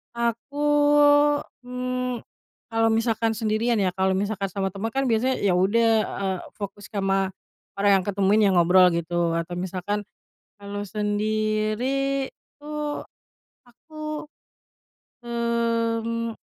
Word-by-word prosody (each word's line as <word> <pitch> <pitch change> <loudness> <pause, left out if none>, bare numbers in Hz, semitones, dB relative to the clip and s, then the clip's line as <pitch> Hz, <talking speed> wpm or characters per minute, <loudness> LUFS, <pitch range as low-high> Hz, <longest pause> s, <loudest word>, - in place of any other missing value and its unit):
Aku, 235 +4 -2 1.1
mmm, 250 -1 -3 0.5
kalau 225 0 +2
misalkan 225 0 +1
sendirian 220 +2 0
ya 195 -4 +1
kalau 190 +1 +1
misalkan 200 0 -1
sama 195 0 -2
temen 200 +3 -3
kan 270 +4 -1
biasanya 250 +4 +2
ya 200 - +3
udah, 200 +6 +3 0.2
eee, 190 -1 -2 0.2
fokus 200 -1 -7
kama 195 -2 -1 0.4
orang 200 -1 +4
yang 185 - -4
kutemuin, 200 +1 +3
yang 190 - +2
ngobrol 180 +1 +6
gitu. 170 0 0
Atau 170 +1 -3
misalkan 190 +3 -3 0.5
kalau 205 0 -6
sendiri 215 +6 -1 0.3
tuh 300 0 -4 0.6
aku, 305 +5 -8 1.0
mmm, 230 -1 -1
215 Hz, 110 wpm, -24 LUFS, 195-235 Hz, 1.1 s, ngobrol